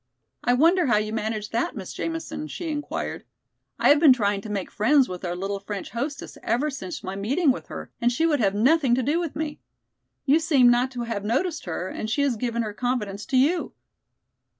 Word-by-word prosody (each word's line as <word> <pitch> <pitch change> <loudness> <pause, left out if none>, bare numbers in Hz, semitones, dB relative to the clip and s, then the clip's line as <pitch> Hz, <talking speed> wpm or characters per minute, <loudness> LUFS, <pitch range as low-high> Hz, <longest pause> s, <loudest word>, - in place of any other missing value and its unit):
"I 245 - +3
wonder 335 +5 +4
how 240 - +4
you 215 +1 -1
managed 215 -1 -3
that, 230 - -1
Miss 195 -5 -7
Jamison?" 315 -2 -4
she 345 0 -5
inquired. 295 -1 -4 0.5
"I - - +3
have 290 - +6
been 295 -4 +8
trying 205 -4 0
to 215 - -8
make 200 -3 -3
friends 260 +5 +4
with 180 0 -7
our 175 -1 -2
little 195 +2 -3
French 200 -1 -6
hostess 275 +6 -5
ever 290 +6 0
since 190 -10 -6
my 190 +1 -4
meeting 270 - +2
with 255 - -5
her - - -8
and 240 +1 +3
she 320 +7 +1
would 305 -4 +2
have 200 -3 +2
nothing 260 +3 +4
to 255 - 0
do 300 +7 +1
with 335 -4 -4
me. 305 -1 -4 0.7
You 290 +3 +5
seem 285 -7 +5
not 245 +2 +2
to 245 - -4
have 230 -4 -3
noticed 275 - -1
her 175 +1 -3
and 215 - -5
she 285 +6 +1
has 275 -4 +1
given 235 +1 -1
her 210 -1 -4
confidence 210 -4 -2
to 260 - +1
you." 315 +7 +2
245 Hz, 215 wpm, -25 LUFS, 210-295 Hz, 0.7 s, been